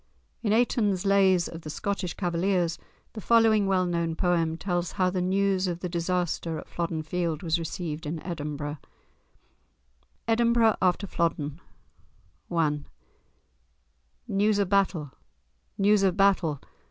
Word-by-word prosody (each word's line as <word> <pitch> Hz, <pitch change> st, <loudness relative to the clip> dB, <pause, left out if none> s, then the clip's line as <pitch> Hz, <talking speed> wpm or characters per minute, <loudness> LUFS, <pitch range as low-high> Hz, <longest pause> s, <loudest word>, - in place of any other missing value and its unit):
In 210 Hz, -, 0 dB
Aytoun's 210 Hz, -4 st, +2 dB
"Lays 190 Hz, -3 st, +4 dB
of 165 Hz, -, -8 dB
the 155 Hz, -, -8 dB
Scottish 185 Hz, +2 st, -3 dB
Cavaliers," 175 Hz, -1 st, 0 dB, 0.3 s
the 215 Hz, -, -7 dB
following 220 Hz, -2 st, +4 dB
well 185 Hz, -1 st, +2 dB
known 170 Hz, -2 st, -1 dB
poem 165 Hz, -2 st, +1 dB
tells 175 Hz, -1 st, -2 dB
how 185 Hz, -2 st, +1 dB
the 180 Hz, -1 st, -1 dB
news 190 Hz, 0 st, +1 dB
of 175 Hz, -1 st, -3 dB
the 180 Hz, -, -3 dB
disaster 170 Hz, -1 st, -1 dB
at -, -, -8 dB
Flodden 165 Hz, -2 st, -3 dB
Field 165 Hz, 0 st, -2 dB
was 165 Hz, 0 st, +1 dB
received 160 Hz, -1 st, -5 dB
in 160 Hz, +2 st, -3 dB
Edinburgh:— 150 Hz, -3 st, -4 dB, 1.5 s
*EDINBURGH 230 Hz, -1 st, +3 dB
AFTER 185 Hz, +2 st, +2 dB
FLODDEN* 165 Hz, -4 st, -2 dB, 0.9 s
I 155 Hz, -3 st, +1 dB, 1.5 s
News 205 Hz, +1 st, +2 dB
of 200 Hz, -3 st, +1 dB
battle! 190 Hz, -8 st, +1 dB, 0.7 s
news 205 Hz, +1 st, +4 dB
of 190 Hz, -1 st, +2 dB
battle! 185 Hz, -7 st, +3 dB
180 Hz, 130 wpm, -27 LUFS, 165-200 Hz, 1.5 s, Lays